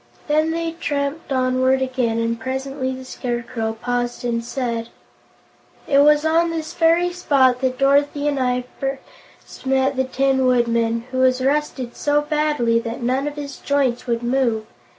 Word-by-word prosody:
Then 310 Hz, +1 st, +2 dB
they 330 Hz, 0 st, -2 dB
tramped 290 Hz, -2 st, -3 dB
onward 260 Hz, 0 st, +2 dB
again, 255 Hz, -3 st, -1 dB
and 230 Hz, 0 st, -1 dB
presently 265 Hz, +2 st, -3 dB
the 260 Hz, 0 st, -7 dB
Scarecrow 240 Hz, -3 st, -3 dB
paused 245 Hz, 0 st, -2 dB
and 230 Hz, -1 st, -1 dB
said: 235 Hz, -2 st, -3 dB, 1.0 s
"It 280 Hz, -1 st, +4 dB
was 300 Hz, +1 st, +5 dB
on 330 Hz, +2 st, +3 dB
this 320 Hz, -1 st, -4 dB
very 340 Hz, +2 st, +3 dB
spot 265 Hz, -7 st, +2 dB
that 255 Hz, -1 st, 0 dB
Dorothy 285 Hz, +2 st, +2 dB
and 285 Hz, -2 st, 0 dB
I 250 Hz, -1 st, 0 dB, 0.2 s
first 270 Hz, 0 st, -8 dB
met 265 Hz, +1 st, +2 dB
the 260 Hz, -, +2 dB
Tin 265 Hz, 0 st, +1 dB
Woodman, 230 Hz, -2 st, +1 dB
who 255 Hz, -, -2 dB
was 255 Hz, 0 st, +3 dB
rusted 275 Hz, -4 st, -1 dB
so 290 Hz, 0 st, +2 dB
badly 295 Hz, -6 st, +1 dB
that 230 Hz, +1 st, -5 dB
none 260 Hz, +4 st, 0 dB
of 295 Hz, -, -4 dB
his 285 Hz, -2 st, -6 dB
joints 270 Hz, -4 st, 0 dB
would 235 Hz, 0 st, -1 dB
move. 240 Hz, -3 st, 0 dB
260 Hz, 155 wpm, -21 LUFS, 245-290 Hz, 1.0 s, was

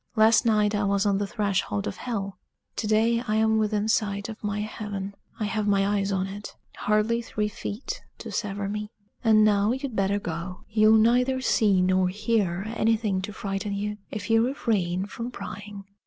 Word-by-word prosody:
Last 220 Hz, +1 st, +5 dB
night 210 Hz, -1 st, +3 dB
I 205 Hz, 0 st, +1 dB
was 200 Hz, 0 st, +1 dB
on 200 Hz, -1 st, +2 dB
the 205 Hz, -, -1 dB
threshold 195 Hz, -, -1 dB
of 100 Hz, -, -4 dB
hell. 200 Hz, -6 st, -4 dB, 0.4 s
To 215 Hz, -, -1 dB
day 225 Hz, +2 st, +3 dB
I 215 Hz, -, +1 dB
am 220 Hz, 0 st, +3 dB
within 210 Hz, 0 st, 0 dB
sight 205 Hz, -1 st, 0 dB
of 220 Hz, 0 st, -9 dB
my 210 Hz, 0 st, -1 dB
heaven 205 Hz, -2 st, -5 dB, 0.3 s
I -, -, -1 dB
have 210 Hz, 0 st, -1 dB
my 200 Hz, -1 st, +3 dB
eyes 195 Hz, 0 st, -1 dB
on 190 Hz, -1 st, 0 dB
it 200 Hz, +2 st, -8 dB, 0.2 s
hardly 215 Hz, +3 st, +1 dB
three 215 Hz, -2 st, -2 dB
feet 220 Hz, -, -5 dB, 0.2 s
to -, -, -8 dB
sever 200 Hz, -1 st, -2 dB
me. 210 Hz, +1 st, -4 dB, 0.3 s
And 215 Hz, -2 st, +6 dB
now 205 Hz, +1 st, +3 dB
you'd 265 Hz, -2 st, -4 dB
better 195 Hz, 0 st, +1 dB
go. 175 Hz, 0 st, -5 dB
You'll 215 Hz, 0 st, +5 dB
neither 250 Hz, +4 st, +3 dB
see 205 Hz, -7 st, +3 dB
nor 185 Hz, 0 st, +3 dB
hear 200 Hz, -3 st, 0 dB
anything 215 Hz, -4 st, +1 dB
to 205 Hz, +3 st, -5 dB
frighten 200 Hz, 0 st, -3 dB
you 210 Hz, +1 st, -3 dB
if 210 Hz, -1 st, -5 dB
you 225 Hz, 0 st, +5 dB
refrain 200 Hz, -8 st, 0 dB
from 230 Hz, +4 st, -6 dB
prying." 205 Hz, -4 st, -8 dB
210 Hz, 185 wpm, -26 LUFS, 200-220 Hz, 0.4 s, And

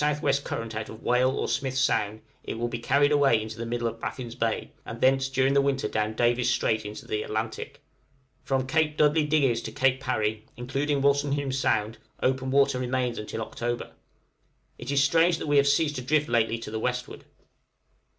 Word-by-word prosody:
W. 150 Hz, -1 st, +1 dB
current 115 Hz, -1 st, -4 dB
out 110 Hz, 0 st, -4 dB
of 110 Hz, +1 st, -11 dB
Whale 125 Hz, +1 st, +3 dB
or 130 Hz, -, -2 dB
Smith's 135 Hz, -1 st, -1 dB
Sound, 110 Hz, -5 st, +1 dB, 0.2 s
it -, -, -5 dB
will 120 Hz, +1 st, -1 dB
be 120 Hz, -, -4 dB
carried 145 Hz, +5 st, +3 dB
away 140 Hz, -6 st, +4 dB
into 110 Hz, 0 st, -6 dB
the 115 Hz, -, -4 dB
middle 120 Hz, 0 st, -1 dB
of 115 Hz, 0 st, -5 dB
Baffin's 120 Hz, -3 st, -5 dB
Bay, 115 Hz, -1 st, -2 dB
and 115 Hz, -, -8 dB
thence 135 Hz, +1 st, +3 dB
during 135 Hz, 0 st, +2 dB
the 140 Hz, -, +4 dB
winter 140 Hz, -1 st, 0 dB
down 110 Hz, 0 st, -2 dB
Davis' 120 Hz, +1 st, +2 dB
Strait 110 Hz, -2 st, 0 dB
into 105 Hz, +1 st, -8 dB
the 105 Hz, -, -2 dB
Atlantic. 110 Hz, +1 st, -5 dB, 0.6 s
From 135 Hz, -1 st, 0 dB
Cape 155 Hz, +2 st, +1 dB
Dudley 150 Hz, 0 st, +3 dB
Digges 135 Hz, -7 st, +2 dB
to -, -, -6 dB
Cape 135 Hz, -1 st, +1 dB
Parry, 110 Hz, -4 st, -1 dB
including 135 Hz, +3 st, -1 dB
Wolstenholme 140 Hz, -1 st, +1 dB
Sound, 110 Hz, -5 st, 0 dB, 0.2 s
open 130 Hz, 0 st, 0 dB
water 135 Hz, -1 st, +3 dB
remains 125 Hz, -1 st, -1 dB
until 110 Hz, +1 st, -4 dB
October. 120 Hz, +1 st, -4 dB, 0.9 s
It 120 Hz, -, -7 dB
is 140 Hz, -1 st, +3 dB
strange 165 Hz, +3 st, +3 dB
that -, -, -5 dB
we 145 Hz, -1 st, +2 dB
have 140 Hz, 0 st, +5 dB
ceased 145 Hz, 0 st, +2 dB
to -, -, -3 dB
drift 150 Hz, +4 st, +1 dB
lately 115 Hz, -1 st, +1 dB
to 115 Hz, -2 st, -8 dB
the 110 Hz, -, -3 dB
westward. 125 Hz, +2 st, -3 dB
130 Hz, 190 wpm, -26 LUFS, 115-140 Hz, 0.9 s, have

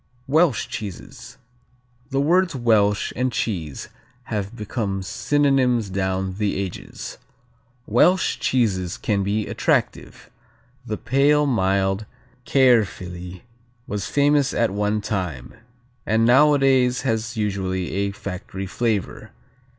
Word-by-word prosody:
Welsh 150 Hz, -3 st, +2 dB
cheeses 100 Hz, -5 st, -8 dB, 0.7 s
The 135 Hz, -, 0 dB
words 175 Hz, +3 st, +2 dB
Welsh 105 Hz, -5 st, +2 dB
and 130 Hz, +1 st, 0 dB
cheese 85 Hz, -, -3 dB, 0.3 s
have 105 Hz, -2 st, -4 dB
become 105 Hz, -3 st, -3 dB
synonyms 130 Hz, -2 st, +1 dB
down 95 Hz, 0 st, -2 dB
the 105 Hz, -2 st, 0 dB
ages. 95 Hz, -3 st, -6 dB, 0.7 s
Welsh 180 Hz, -, +3 dB
"cheeses 95 Hz, -8 st, 0 dB
can 100 Hz, -2 st, 0 dB
be 100 Hz, +2 st, -1 dB
attractive: -, -, -2 dB, 0.6 s
the 105 Hz, -, -3 dB
pale, 145 Hz, +3 st, +3 dB
mild 95 Hz, -4 st, +1 dB, 0.4 s
Caerphilly 95 Hz, -9 st, +1 dB, 0.4 s
was 100 Hz, -2 st, -4 dB
famous 145 Hz, -1 st, +2 dB
at 115 Hz, -4 st, +1 dB
one 105 Hz, +1 st, 0 dB
time, 90 Hz, -, -4 dB, 0.5 s
and 110 Hz, +1 st, +2 dB
nowadays 135 Hz, -1 st, +4 dB
has 115 Hz, -1 st, -2 dB
usually 95 Hz, -3 st, -2 dB
a 100 Hz, +1 st, -1 dB
factory 95 Hz, 0 st, -6 dB
flavor. 105 Hz, 0 st, -2 dB
105 Hz, 105 wpm, -22 LUFS, 95-130 Hz, 0.7 s, nowadays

